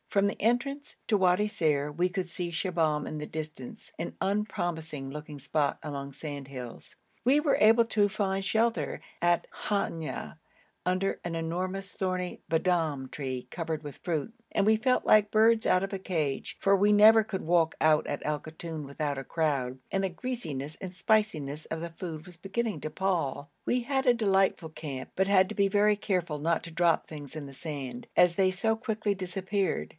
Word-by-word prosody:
From 200 0 +3
the 200 - -4
entrance 275 +6 0
to 220 - +3
Wadi 190 +1 +3
Ser 150 -8 +1
we 175 +5 0
could 180 0 -3
see 175 0 -3
Shibahm 165 -5 0
in 155 - -4
the 150 - -4
distance, 155 -5 -7
an 170 - -4
unpromising 175 -8 -2
looking 150 +1 -7
spot 145 +1 0
among 140 -2 -5
sandhills. 135 -4 -8 0.3
We 270 +4 +5
were 300 -2 +2
all - - +2
able 230 +2 +6
to 210 -2 +2
find 195 -1 -1
shelter 220 -8 +1 0.2
at 175 0 +2 0.2
Hanya 165 -9 -2 0.5
under 185 +2 0
an 170 -1 -3
enormous 185 +4 -3
thorny 185 -1 -2
b'dom 160 -5 +1
tree 130 -3 -4
covered 160 -3 -3
with 145 -3 -8
fruit, 170 +5 -2 0.2
and 200 - +2
we 220 +1 +6
felt 250 +4 +1
like 210 -1 +5
birds 220 +1 +4
out 185 - +4
of 195 +1 -4
a 195 - -2
cage, 160 -8 -2
for 200 0 +4
we 205 +2 +4
never 215 +2 +8
could 200 -3 -4
walk 165 -1 +3
out 155 -1 +4
at - - -3
Al 150 -1 0
Koton 160 -1 -7
without 140 0 -2
a - - -5
crowd, 140 -5 -1
and 195 0 +1
the 190 - +1
greasiness 160 - -5
and 185 -2 -6
spiciness 165 -8 0
of 160 - -3
the 170 +1 -5
food 165 -2 -6
was 180 -2 -12
beginning 205 +5 -3
to 155 - -3
pall. 155 -5 -1 0.2
We 250 - +1
had 265 +2 0
a 245 - +6
delightful 195 -6 +2
camp, 140 -4 -6
but 190 +1 +2
had 190 -1 +5
to - - -5
be 200 -1 +3
very 210 +1 +4
careful 180 -7 -1
not 165 +2 +1
to 165 - -8
drop 170 0 +2
things 145 -3 -8
in 155 -2 -6
the 140 - -10
sand, 135 -5 -6
as 175 -1 +6
they 190 0 +3
so 220 +4 +1
quickly 220 -2 -1
disappeared. 190 +1 -1
175 Hz, 185 wpm, -29 LUFS, 150-200 Hz, 0.5 s, never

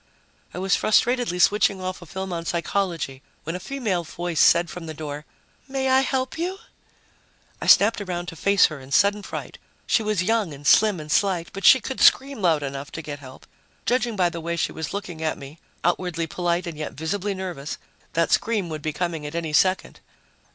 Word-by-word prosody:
I - - -9
was 190 +1 +2
frustratedly 240 -3 +2
switching 200 +1 +3
off 185 0 -5
a 175 - -11
film 190 +2 -5
on 165 -1 -3
psychology 170 -5 -2 0.2
when 165 +3 -4
a - - -4
female 215 -6 -2
voice 170 0 -4
said 170 +1 +5
from 165 0 -8
the 155 - -6
door, 150 -1 -6 0.4
"May 265 -1 -1
I 260 - +6
help 265 +3 -1
you?" 365 +3 -2 1.0
I - - -4
snapped 210 +2 +6
around 175 -3 -4
to 165 - -9
face 200 +4 +4
her 155 -3 -3
in 130 +1 -13
sudden 205 +7 +3
fright. - - -7 0.3
She - - +2
was 210 -4 0
young 210 -6 0
and 145 +1 -14
slim 210 +3 +5
and 155 0 -7
slight, 185 -3 +1
but 195 0 -5
she 260 - +9
could 265 +2 -5
scream 270 -3 +4
loud 160 -5 +2
enough 140 +1 -5
to 160 - -6
get 145 -1 -6
help. 130 -1 -13 0.4
Judging 245 -2 +1
by 180 -3 +2
the 170 - -6
way 170 +1 -2
she 170 - -1
was 160 -2 -5
looking 185 -5 -6
at 160 -1 -1
me, 140 +3 -11 0.2
outwardly 175 -1 0
polite 175 +2 -1
and 165 -3 -6
yet 155 - -4
visibly 195 +6 -2
nervous, 175 -7 -5 0.4
that 165 0 +1
scream 210 -6 +1
would 155 -1 -5
be 155 0 -3
coming 165 -2 -3
at 150 - -8
any 165 -2 -3
second. 185 +5 +2
175 Hz, 200 wpm, -24 LUFS, 160-205 Hz, 1.0 s, she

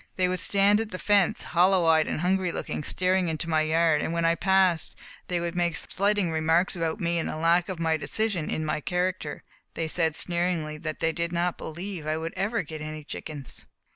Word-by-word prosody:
They 185 -1 +2
would 180 0 -1
stand 200 +3 +3
at 225 -1 -3
the 185 - -5
fence, 200 -1 +2
hollow 180 0 +3
eyed 160 -1 +4
and - - -2
hungry 185 0 +1
looking, 150 - -4
staring 185 +2 +1
into 160 +1 -2
my 160 -1 +2
yard, 160 0 +2
and 165 - -2
when 170 0 0
I 165 - +4
passed 185 -1 +2 0.3
they 175 -1 -1
would 170 0 -3
make 175 -2 0
slighting 200 -2 0
remarks 160 +4 +2
about 165 +2 -2
me 170 -2 0
and - - -2
the - - -4
lack 170 +3 +2
of 185 - -4 0.2
decision 205 -3 -1
in 155 - -2
my 155 0 -1
character. 180 -3 -2 0.3
They 165 - -2
said 160 -1 +1
sneeringly 170 -4 -1
that 155 0 -5
they 165 - +2
did 170 +1 -2
not 175 0 0
believe 170 0 -6
I 155 0 0
would 165 +1 -4
ever 195 +2 -1
get 155 0 -8
any 155 0 -6
chickens. 145 -3 -8
170 Hz, 205 wpm, -26 LUFS, 160-185 Hz, 0.3 s, eyed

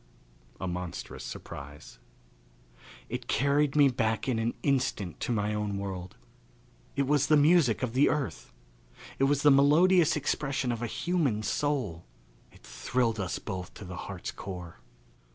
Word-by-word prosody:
A 95 - -3
Monstrous 90 -1 -5
Surprise. 70 -3 -9 1.1
It - - -5
carried 140 +1 +2
me 145 -2 +7
back 115 -3 0
in 120 -4 +1
an 115 +1 -1
instant 130 - 0
to - - -2
my 105 -2 0
own 105 -1 -2
world. 95 -2 -5 0.8
It 140 0 +1
was 145 0 +2
the 155 +1 +5
music 145 -6 +4
of 120 -3 -2
the 135 +3 +4
earth. 135 - -3 0.7
It 135 - +4
was 145 +1 +1
the 145 - +7
melodious 160 +5 +5
expression 135 -3 -1
of 120 -1 -4
a 120 - -1
human 140 -7 0
soul. 110 - -1 0.5
It - - -20
thrilled 115 -3 -1
us 95 -2 -2
both 95 -4 -6
to 100 - -9
the 90 0 -7
heart's 95 -3 -5
core. 90 -6 -8
120 Hz, 150 wpm, -29 LUFS, 100-145 Hz, 1.1 s, me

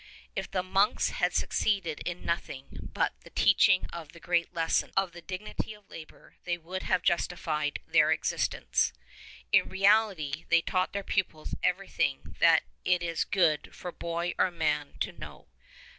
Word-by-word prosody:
If - - -3
the 185 -2 -1
monks 195 +4 +2
had - - +1
succeeded 195 -7 0
in 175 0 -5
nothing 140 -5 -4
but - - 0
the - - -13
teaching* 190 -1 +4
of 165 -3 -8
the 170 - -13
great 170 0 0
lesson 165 -2 0
of 195 -2 +2
the 175 0 -11
dignity 190 +4 -5
of 210 -1 -21
labour 160 -1 -12
they 175 -1 -1
would 180 +3 -6
have 185 -1 0
justified 155 -4 0
their - - +4
existence; - - 0 0.6
in - - +4
reality 190 -7 +2
they 170 - +5
taught 185 0 0
their 200 0 -2
pupils 175 -6 -2
everything 180 -6 -1
that 165 -1 +6 0.2
it 180 -1 +2
is 165 -1 0
good 165 -6 +1
for 180 - -6
boy 170 +1 -3
or - - +4
man 150 -4 -1
to - - 0
know. - - -11
175 Hz, 160 wpm, -29 LUFS, 165-190 Hz, 0.6 s, that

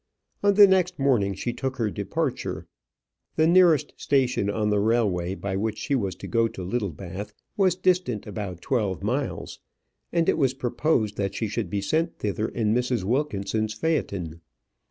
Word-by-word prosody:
On 200 0 +3
the 205 0 +10
next 190 -2 +2
morning 120 -8 +2
she 120 +6 -3
took 130 +2 -3
her 110 -4 0
departure. 135 +8 -3 0.7
The 155 - +3
nearest 170 -4 +5
station 130 -7 +1
on 105 0 0
the 105 - +2
railway 100 -5 +1
by 100 -1 -4
which 110 +2 -1
she 145 - -2
was 100 -9 0
to - - -9
go 115 -1 +2
to 95 - -8
Littlebath 100 0 -4 0.2
was 190 -3 +3
distant 180 - +1
about 100 -4 -6
twelve 100 -8 -1
miles, 130 +6 -3 0.5
and 170 -1 +1
it - - +2
was 135 -2 +2
proposed 120 -4 0
that 100 -1 -2
she 110 - -1
should 105 +2 -3
be 100 -1 -1
sent 160 +10 0
thither 105 +1 -2
in 110 -2 0
Mrs. 125 -3 0
Wilkinson's 110 -3 -1
phaëton. 95 - -1
115 Hz, 165 wpm, -25 LUFS, 100-140 Hz, 0.7 s, the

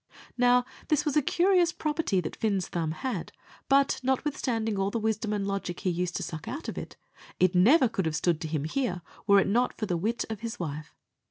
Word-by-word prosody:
Now, 245 0 +4 0.2
this 300 -1 +2
was 295 - 0
a 300 - +5
curious 355 +3 +3
property 300 - 0
that 155 - -5
Fin's 200 -4 0
thumb 165 -2 -2
had; 240 +12 -4 0.4
but, 275 0 +4
notwithstanding 250 -5 -1
all 195 0 +1
the 230 - -2
wisdom 220 -1 -1
and 205 -2 -1
logic 195 -3 -3
he 185 - +1
used, 180 +1 -2
to - - -2
suck 160 -1 -6
out 290 +5 -5
of - - -4
it, - - -7 0.4
it 185 - +5
could 180 - +5
never 255 - +6 0.2
have 160 -1 -1
stood 165 +1 +1
to 160 - -3
him 155 -2 -2
here 180 - -2 0.2
were 200 -1 +7
it - - +1
not 240 +5 +1
for 215 - -2
the 180 -4 -1
wit 225 +7 -1
of 220 -2 -5
his 230 +2 -5
wife. 150 -3 -5
215 Hz, 220 wpm, -28 LUFS, 180-260 Hz, 0.4 s, were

